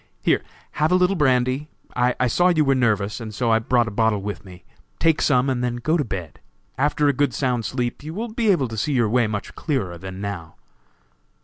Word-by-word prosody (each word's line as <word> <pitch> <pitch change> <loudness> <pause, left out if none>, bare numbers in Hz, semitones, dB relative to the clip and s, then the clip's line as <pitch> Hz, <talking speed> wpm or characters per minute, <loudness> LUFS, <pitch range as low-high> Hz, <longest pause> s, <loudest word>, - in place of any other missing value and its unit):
Here, - - +3 0.3
have 155 +2 0
a - - +5
little 180 +1 +3
brandy; 130 -1 +1 0.3
I 125 0 +1
saw 175 +9 +3
you 160 -4 +3
were 135 - +4
nervous, 105 -5 +1
and 110 -2 -7
so 115 -2 +2
brought 120 +1 +2
a - - -4
bottle 110 0 +1
with 105 0 -5
me; 90 -2 -13 0.3
take 165 -2 +2
some, 130 -2 +3
and 125 -2 0
then 120 -1 -1
go 155 +7 0
to 160 - +1
bed. 95 - -6 0.4
After 145 +1 +1
a 140 - +3
good 140 -2 0
sound 125 -4 0
sleep 120 +3 -2
you 155 +2 -7
will 230 +3 -3
be 225 0 0
able 170 -10 +3
to 110 - -6
see 140 +7 0
your 120 -4 +2
way 120 0 +2
much 105 -1 -5
clearer 95 - -3
than 95 +1 -8
now." 100 -5 -6
125 Hz, 215 wpm, -22 LUFS, 110-145 Hz, 0.4 s, a